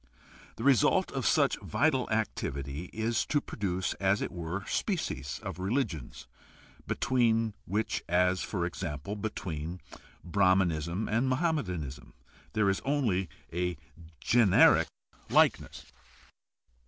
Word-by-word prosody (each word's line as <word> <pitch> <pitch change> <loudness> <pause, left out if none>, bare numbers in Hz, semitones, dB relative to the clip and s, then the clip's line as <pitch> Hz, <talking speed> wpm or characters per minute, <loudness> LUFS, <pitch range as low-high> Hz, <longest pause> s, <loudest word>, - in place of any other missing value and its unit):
The 115 - -6
result 135 -5 +4
of - - -1
such - - +3
vital 140 -4 +1
activity 70 - -2
is 110 0 0
to 145 - +2
produce, 95 -8 -2
as 95 +1 +2
it - - -3
were, 85 +3 -4
species 70 - -2
of - - -6
religions, 95 - -2 0.6
between 115 -3 +1
which, 105 +3 -1
as, 90 +1 +3
for 90 -4 -2
example, 85 0 -4
between 90 -5 -4 0.4
Brahmanism 90 -1 +1
and 115 +5 +1
Mohammedanism, 90 - -2 0.4
there 110 -2 +2
is 95 0 +1
only 115 - 0 0.2
a 90 -1 -1 0.4
generic 115 -6 +5 0.4
likeness. - - +2
95 Hz, 105 wpm, -30 LUFS, 85-115 Hz, 0.6 s, generic